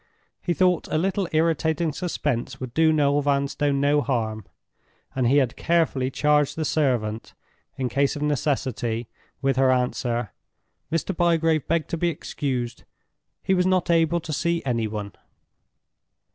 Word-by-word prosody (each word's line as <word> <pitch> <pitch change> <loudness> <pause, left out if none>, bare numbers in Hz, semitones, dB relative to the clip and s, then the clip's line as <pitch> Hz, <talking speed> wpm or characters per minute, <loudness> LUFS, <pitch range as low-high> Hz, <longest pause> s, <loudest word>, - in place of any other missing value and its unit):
He 175 - -1
thought 180 -1 +2
a - - -1
little 190 +2 0
irritating 160 0 +1
suspense 140 -7 -2
would 130 -2 -6
do 160 0 +4
Noel 145 -2 +2
Vanstone 140 0 0
no 145 +1 +3
harm, 110 -6 -2 0.7
and 130 -2 +1
he 135 +4 +4
had 130 -4 +2
carefully 160 -6 +1
charged 150 +1 +2
the 160 - -2
servant, 120 -8 -1 0.4
in 130 - -1
case 140 +2 +1
of 145 - -4
necessity, 130 -6 -1 0.3
with 135 -1 +1
her 135 0 +4
answer: 125 -3 -1 0.6
"Mr. 165 +3 -1
Bygrave 165 -3 +2
begged 165 -1 0
to 170 - -1
be 175 +1 +1
excused; 130 -6 -4 0.6
he 190 - +2
was 180 0 +2
not 185 -2 +2
able 165 0 +3
to 160 -2 -5
see 170 +3 0
any 115 -4 0
one." 105 -1 -5
145 Hz, 145 wpm, -24 LUFS, 130-165 Hz, 0.7 s, do